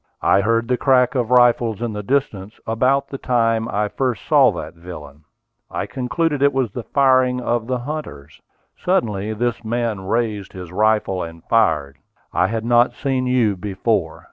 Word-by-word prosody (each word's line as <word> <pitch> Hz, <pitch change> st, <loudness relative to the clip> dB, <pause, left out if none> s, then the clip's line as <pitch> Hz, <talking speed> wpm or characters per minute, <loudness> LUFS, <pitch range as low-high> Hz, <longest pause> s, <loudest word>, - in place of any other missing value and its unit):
I 100 Hz, -, +4 dB
heard 115 Hz, +3 st, +1 dB
the 125 Hz, 0 st, +1 dB
crack 130 Hz, -1 st, +3 dB
of 125 Hz, -4 st, -1 dB
rifles 120 Hz, -3 st, +3 dB
in 120 Hz, -2 st, -3 dB
the 105 Hz, -, -4 dB
distance, 110 Hz, -4 st, -2 dB
about 130 Hz, +5 st, +1 dB
the 135 Hz, -, -6 dB
time 115 Hz, -2 st, +1 dB
I 105 Hz, +1 st, 0 dB
first 125 Hz, 0 st, -2 dB
saw 140 Hz, -5 st, +5 dB
that 80 Hz, +1 st, -7 dB
villain. 80 Hz, -4 st, -11 dB, 0.4 s
I -, -, -3 dB
concluded 145 Hz, +3 st, -2 dB
it 140 Hz, 0 st, +4 dB
was 130 Hz, -5 st, 0 dB
the 120 Hz, -, -5 dB
firing 130 Hz, -2 st, +3 dB
of 120 Hz, -2 st, -1 dB
the 130 Hz, 0 st, -1 dB
hunters. 120 Hz, -, -7 dB, 0.3 s
Suddenly 110 Hz, -, -1 dB
this 120 Hz, +1 st, -2 dB
man 115 Hz, -3 st, -2 dB
raised 110 Hz, -3 st, -2 dB
his 90 Hz, -2 st, -9 dB
rifle 105 Hz, -1 st, +1 dB
and 85 Hz, 0 st, -8 dB
fired. 70 Hz, -11 st, +1 dB, 0.3 s
I 90 Hz, +1 st, +2 dB
had 115 Hz, +1 st, -3 dB
not 120 Hz, +1 st, +3 dB
seen 130 Hz, -2 st, -1 dB
you 120 Hz, -5 st, +2 dB
before. 95 Hz, -2 st, -2 dB
115 Hz, 170 wpm, -20 LUFS, 100-125 Hz, 0.4 s, saw